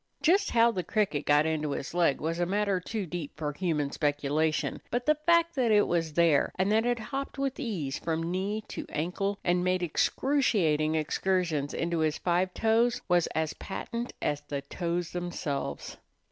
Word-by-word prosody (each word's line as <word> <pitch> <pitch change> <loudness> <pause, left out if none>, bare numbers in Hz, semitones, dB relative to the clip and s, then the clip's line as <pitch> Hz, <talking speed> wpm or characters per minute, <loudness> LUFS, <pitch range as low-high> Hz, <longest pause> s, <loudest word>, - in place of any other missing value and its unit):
Just 390 +5 +4
how 235 0 +4
the 185 -5 -3
cricket 180 -6 -1
got 145 +1 +5
into 155 -2 -1
his 140 - -5
leg 170 -5 +2
was 165 +2 -2
a 175 - +2
matter 200 0 +1
too 205 +2 -4
deep 170 -4 -6
for 150 -1 -3
human 150 -4 -1
speculation; 150 +1 0
but 245 +1 -1
the 305 - +5
fact 335 0 +4
that 250 -4 +1
it 210 -1 +5
was 165 -3 -1
there, 165 -3 +3
and 190 +2 +1
that 220 +2 +3
it 245 0 +1
hopped 270 +6 -5
with 275 -1 -2
ease 175 - -3
from 165 +1 -2
knee 200 +4 -2
to - - -6
ankle, 180 +6 -2
and 180 0 +2
made 185 0 +1
excruciating 170 - +1
excursions 160 -2 0
into 170 0 -1
his 155 -1 +1
five 180 +1 +1
toes, 230 +2 +2
was 175 -2 +3
as 160 -1 0
patent 235 +4 -5
as 145 0 0
the 145 -1 -5
toes 170 +3 -3
themselves. 175 -5 -4
175 Hz, 175 wpm, -29 LUFS, 155-215 Hz, -, got